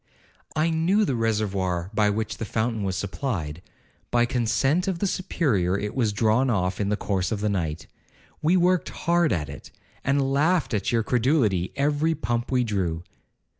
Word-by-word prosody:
'I 160 +1 +2
knew 180 +7 +2
the 140 - 0
reservoir 100 -5 -1
by 105 -1 +3
which 110 +1 -2
the - - -4
fountain 110 0 -1
was 95 -2 -1
supplied—by 100 - -3
consent 135 - +1
of 190 -3 0
the 200 - -1
Superior 110 - 0
it 105 +1 -3
was 115 -5 +1
drawn 115 +5 +2
off 95 -3 0
in 100 - 0
the 105 - 0
course 95 -2 -1
of 105 - -1
the 105 +1 0
night. 85 -6 -2 0.6
We 170 +4 +3
worked 180 0 +2
hard 170 -1 +1
at 80 -7 -1
it, - - -10 0.3
and 140 0 +1
laughed 155 +1 +2
at 100 -3 0
your 115 -2 +2
credulity 115 - +1
every 150 +3 +1
pump 120 -5 -2
we 125 -1 +3
drew.' 90 -7 -2
115 Hz, 170 wpm, -25 LUFS, 100-145 Hz, 0.6 s, by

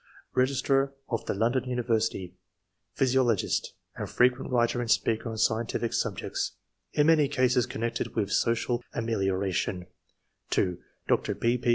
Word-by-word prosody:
Re 130 0 +4
gistrar 135 0 +1 0.2
of 115 - -2
the - - 0
London 120 +5 +1
University, 115 -7 -1 0.6
physio 130 0 +3
logist, 115 -5 +1 0.3
and - - -5
frequent 125 +1 +2
writer 120 0 +2
and 120 - -4
speaker 115 +1 +1
on 110 - -5
scientific 115 +1 0
subjects, - - -2 0.4
in 150 - +3
many 155 -2 +5
cases 130 -3 +2
connected 115 +1 -3
with 105 -3 0
social 120 +1 +1
amelioration; 95 -5 -1 0.6
(2) 90 -2 +1 0.3
Dr. - - +1
P. 120 +1 +1
P. 120 - -1
120 Hz, 140 wpm, -28 LUFS, 110-125 Hz, 0.6 s, many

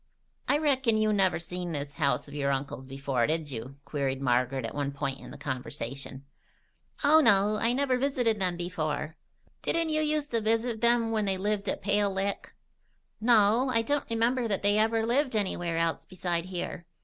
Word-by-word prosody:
"I 285 - +3
reckon 265 -7 +2
you 215 0 +2
never 195 -3 +3
seen 175 +1 -5
this 140 -1 -4
house 140 -3 0
of 140 - -11
your 140 -1 -1
uncle's 135 -1 -3
before, 135 -3 -1
did 155 -2 -2
you?" 125 +2 -6
queried 135 -3 -2
Margaret 125 0 +1
at - - -5
one 140 -1 -2
point 140 -1 -3
in - - -11
the 135 - -10
conversation. 135 -1 -5 0.8
"Oh, 300 +2 +7
no. 205 -3 +4
I 230 +2 +1
never 260 -1 +1
visited 245 -5 +1
them 180 -2 0
before." 160 -3 -3 0.5
"Didn't 335 -1 +1
you 310 0 +1 0.2
uster 285 -6 -2
visit 225 +1 0
'em 235 -1 +3
when 215 -2 0
they 190 -1 0
lived 205 +1 -1
at - - -3
Pale 200 0 +1
Lick?" 195 +1 -2 0.7
"No. 225 +2 +4
I 230 -2 +2
don't 285 +3 -1
remember 230 +2 +1
that 200 -3 -1
they 205 +1 +3
ever 225 +1 +2
lived 255 +1 +1
anywhere 175 -5 -1
else 165 0 0
beside 175 -2 -3
here." 175 -2 -5
195 Hz, 180 wpm, -28 LUFS, 145-230 Hz, 0.8 s, Oh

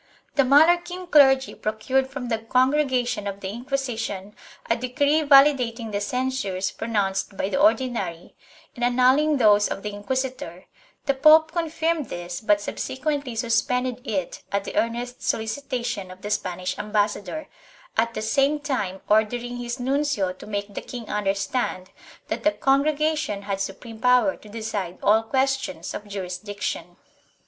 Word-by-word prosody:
The 285 - +4
Mallorquin 345 +7 +4
clergy 270 -3 +5
procured 255 +5 -1
from 265 -3 -6
the 225 -2 0
Congregation 255 -2 +1
of 200 0 -5
the 190 - -5
Inquisition 230 -4 -4 0.3
a 230 - +2
decree 285 +5 +1
validating 275 -6 +4
the 205 0 -2
censures 250 -5 -1
pronounced 200 -3 -2
by 190 - -1
the 275 - 0
Ordinary 240 - +1 0.4
and 240 - -5
annulling 260 +5 +4
those 210 -4 +5
of 195 - -5
the 210 -1 -4
inquisitor; 205 -4 -4 0.4
the 275 - +2
pope 310 +3 +6
confirmed 325 -2 -1
this 175 0 -5
but 205 -2 +3
subsequently 270 +4 -3
suspended 250 +2 0
it 190 -7 -3
at 200 0 0
the - - -7
earnest 240 +2 -1
solicitation 235 -3 -2
of 185 +1 -12
the 205 - -4
Spanish 185 -3 -2
ambassador, 210 +7 -1 0.5
at 230 +1 +1
the 215 - -3
same 275 +6 +2
time 230 -11 -3
ordering 240 +3 +1
his 240 +1 -4
nuncio 265 -7 0
to 185 - -13
make 205 -1 -4
the - - -4
king 240 -3 -8
understand 200 -1 -1 0.4
that - - -3
the 310 - +4
Con 275 -2 +2
gregation 305 -8 0
had 195 -1 -3
supreme 220 +4 -6
power 250 +3 +4
to 210 - -16
decide 205 -5 -4
all 215 +2 +5
questions 265 -8 -1
of 210 - -6
jurisdic 200 +1 -6
tion. - - -3
240 Hz, 145 wpm, -24 LUFS, 205-270 Hz, 0.5 s, pope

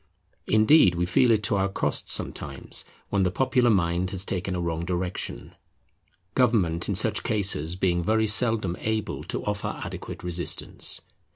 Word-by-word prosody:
Indeed, 110 - +5
we 85 +1 0
feel 120 +8 +3
it 110 -2 +3
to 100 - +1
our 95 0 +1
cost 95 - -2
sometimes 70 -1 -2 0.2
when 100 - +1
the 95 - +2
popular 125 +4 +2
mind 90 -3 +1
has 95 +1 -3
taken 95 -1 -3
a - - -2
wrong 85 -1 -2
direction; 90 +1 -4 0.8
government 100 -10 +1
in - - 0
such - - +1
cases 95 -6 0
being 90 -2 0
very 110 +4 +2
seldom 105 -4 +3
able 110 0 -3
to - - -5
offer 105 -1 -3
adequate - - -7
resistance. 90 0 0
95 Hz, 155 wpm, -25 LUFS, 85-110 Hz, 0.8 s, Indeed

